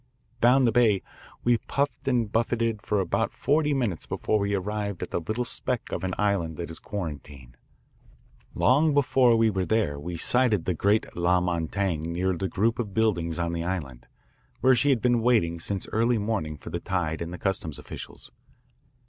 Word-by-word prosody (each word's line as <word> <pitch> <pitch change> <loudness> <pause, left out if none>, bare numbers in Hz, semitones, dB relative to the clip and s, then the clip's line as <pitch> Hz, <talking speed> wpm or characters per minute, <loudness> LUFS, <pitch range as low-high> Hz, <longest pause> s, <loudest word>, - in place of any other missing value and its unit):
Down 125 +3 +5
the 120 - +4
bay 110 -4 +3 0.4
we 120 -1 +3
puffed 140 0 -2
and 120 -5 +1
buffeted 115 -1 0
for 105 0 0
about 95 -3 -1
forty 150 +1 +1
minutes 120 - -1
before 110 - 0
we 100 0 0
arrived 100 0 -3
at - - -7
the - - 0
little 110 +9 -2
speck 120 0 -2
of - - -3
an 95 -1 -2
island 95 -7 0
that 85 -1 -5
is 80 - -8
Quarantine. 70 -9 -7 1.0
Long 145 +5 +3
before 130 -4 +4
we 115 -1 +3
were 95 -2 -1
there 90 -9 0
we 85 +3 -5
sighted 125 +2 +2
the 90 - +1
great 100 +6 +1
La 90 +1 +3
Montaigne 85 -1 -1
near 95 +1 0
the 95 +2 -3
group 110 +7 0
of 105 -5 -4
buildings 85 -7 +1
on 85 -1 -1
the 85 0 -2
island, 70 -9 -4 0.5
where 130 - +6
she 135 +4 +2
had 130 -5 +2
been 120 -2 +3
waiting 110 -9 +2
since 95 +3 -3
early 115 +2 +2
morning 100 -8 -2
for - - -10
the - - -2
tide 85 -4 -2
and 85 0 -4
the 90 - -6
customs 85 -5 -2
officials. - - -9
100 Hz, 180 wpm, -26 LUFS, 85-115 Hz, 1.0 s, where